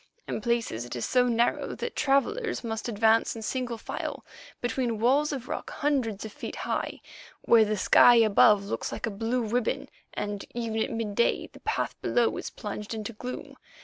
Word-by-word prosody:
In -, -, -3 dB
places 235 Hz, -, -1 dB
it 120 Hz, +1 st, -7 dB
is 120 Hz, -, -2 dB
so 250 Hz, -1 st, +3 dB
narrow 235 Hz, 0 st, +1 dB
that 475 Hz, -, -5 dB
travellers 305 Hz, -, +1 dB
must 225 Hz, 0 st, -3 dB
advance 225 Hz, +1 st, +3 dB
in 225 Hz, -, -7 dB
single 245 Hz, 0 st, -2 dB
file -, -, -5 dB, 0.3 s
between 245 Hz, -1 st, -1 dB
walls 275 Hz, +6 st, +3 dB
of 265 Hz, -4 st, -5 dB
rock -, -, -4 dB
hundreds 255 Hz, -9 st, -1 dB
of 215 Hz, -, -8 dB
feet -, -, -6 dB
high, -, -, -3 dB, 0.4 s
where 230 Hz, -1 st, +6 dB
the 215 Hz, 0 st, -1 dB
sky 240 Hz, +5 st, +7 dB
above 210 Hz, -2 st, +5 dB
looks 200 Hz, -, -3 dB
like -, -, -3 dB
a 230 Hz, -, -3 dB
blue 230 Hz, +4 st, -1 dB
ribbon, 230 Hz, +2 st, -1 dB, 0.3 s
and 205 Hz, -1 st, -3 dB
even 225 Hz, -2 st, -2 dB
at -, -, 0 dB
midday 225 Hz, -1 st, 0 dB
the -, -, -13 dB
path -, -, -1 dB
below 240 Hz, -1 st, +2 dB
is -, -, -4 dB
plunged 210 Hz, +1 st, -6 dB
in 215 Hz, -, -4 dB
gloom. 235 Hz, +4 st, -6 dB
230 Hz, 180 wpm, -28 LUFS, 215-245 Hz, 0.4 s, sky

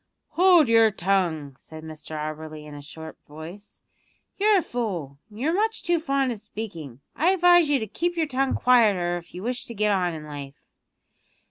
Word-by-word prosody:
"Hold 345 Hz, -1 st, +5 dB
your 225 Hz, -1 st, +5 dB
tongue!" 175 Hz, -8 st, -1 dB
said 155 Hz, 0 st, -11 dB
Mr 155 Hz, 0 st, -8 dB
Auberly 155 Hz, 0 st, -6 dB
in 150 Hz, -, -10 dB
a 145 Hz, -, -9 dB
sharp 160 Hz, +2 st, -11 dB
voice; 165 Hz, +7 st, -11 dB, 0.5 s
"you're 415 Hz, +1 st, +4 dB
a 360 Hz, -, +1 dB
fool, 180 Hz, -, -4 dB
and 210 Hz, 0 st, -13 dB
you're 305 Hz, +6 st, 0 dB
much 435 Hz, +3 st, 0 dB
too 345 Hz, -1 st, +1 dB
fond 275 Hz, -4 st, 0 dB
of 225 Hz, -, -5 dB
speaking. 180 Hz, -, -8 dB
I 330 Hz, +5 st, +2 dB
advise 350 Hz, -3 st, +5 dB
you 290 Hz, -, +3 dB
to 220 Hz, -, -3 dB
keep 345 Hz, -, -3 dB
your 325 Hz, -, +2 dB
tongue 270 Hz, -1 st, 0 dB
quieter 205 Hz, -8 st, +3 dB
if 175 Hz, 0 st, -12 dB
you 180 Hz, -, -7 dB
wish 245 Hz, +1 st, -3 dB
to 235 Hz, -, -9 dB
get 210 Hz, 0 st, +1 dB
on 180 Hz, -4 st, 0 dB
in 155 Hz, -1 st, -8 dB
life." 140 Hz, -2 st, -8 dB
210 Hz, 190 wpm, -25 LUFS, -, 0.5 s, Hold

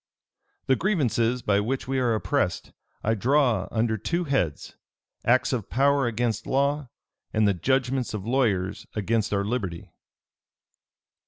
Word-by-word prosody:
"The 130 Hz, -, +3 dB
grievances 125 Hz, -, +1 dB
by 100 Hz, -1 st, +2 dB
which 125 Hz, +5 st, -2 dB
we 135 Hz, 0 st, 0 dB
are 120 Hz, -3 st, +2 dB
oppressed, 110 Hz, -, -1 dB, 0.3 s
I 110 Hz, -, +2 dB
draw 120 Hz, -4 st, +2 dB
under 110 Hz, -1 st, 0 dB
two 170 Hz, -, -1 dB
heads; 135 Hz, -, -1 dB, 0.5 s
acts 130 Hz, +3 st, +3 dB
of 115 Hz, -6 st, -3 dB
power 140 Hz, 0 st, +3 dB
against 115 Hz, -1 st, -1 dB
law, 140 Hz, 0 st, 0 dB, 0.4 s
and 110 Hz, -1 st, +2 dB
the 100 Hz, -, +3 dB
judgments 130 Hz, +5 st, 0 dB
of 100 Hz, -2 st, -5 dB
lawyers 110 Hz, -5 st, 0 dB
against 110 Hz, +1 st, 0 dB
our 100 Hz, -1 st, 0 dB
liberty." 100 Hz, -7 st, -3 dB
120 Hz, 135 wpm, -26 LUFS, 105-135 Hz, 0.5 s, The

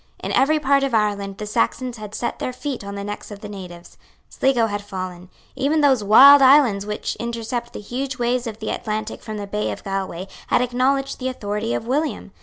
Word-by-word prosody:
In -, -, -3 dB
every 305 Hz, +3 st, +3 dB
part 280 Hz, -1 st, +3 dB
of 275 Hz, -4 st, 0 dB
Ireland 200 Hz, -2 st, 0 dB
the 210 Hz, -, -5 dB
Saxons 235 Hz, -, -1 dB
had 210 Hz, -1 st, -8 dB
set 240 Hz, -, -3 dB
their -, -, -2 dB
feet 265 Hz, -2 st, -5 dB
on 200 Hz, 0 st, -6 dB
the 200 Hz, -, -5 dB
necks 205 Hz, +1 st, -6 dB
of 205 Hz, -1 st, -10 dB
the 210 Hz, -, -7 dB
natives. 180 Hz, -4 st, -10 dB, 0.3 s
Sligo 255 Hz, -4 st, +2 dB
had 205 Hz, -2 st, -3 dB
fallen. 185 Hz, -3 st, -7 dB, 0.3 s
Even 285 Hz, +4 st, +1 dB
those 265 Hz, -6 st, +4 dB
wild 275 Hz, +8 st, +9 dB
islands 260 Hz, -7 st, +5 dB
which 210 Hz, 0 st, -3 dB
intercept 235 Hz, +1 st, -4 dB
the -, -, -7 dB
huge 255 Hz, +5 st, -4 dB
waves 245 Hz, 0 st, 0 dB
of 220 Hz, -2 st, -6 dB
the 220 Hz, -, -4 dB
Atlantic 215 Hz, -1 st, -4 dB
from 215 Hz, -2 st, -6 dB
the 205 Hz, -, -4 dB
bay 210 Hz, +1 st, -2 dB
of -, -, -7 dB
Galway 190 Hz, -2 st, -4 dB, 0.2 s
had -, -, +3 dB
acknowledged 270 Hz, +3 st, 0 dB
the 260 Hz, 0 st, -2 dB
authority 210 Hz, -2 st, -3 dB
of -, -, -4 dB
William. 290 Hz, +6 st, -2 dB
225 Hz, 210 wpm, -22 LUFS, 205-260 Hz, 0.3 s, wild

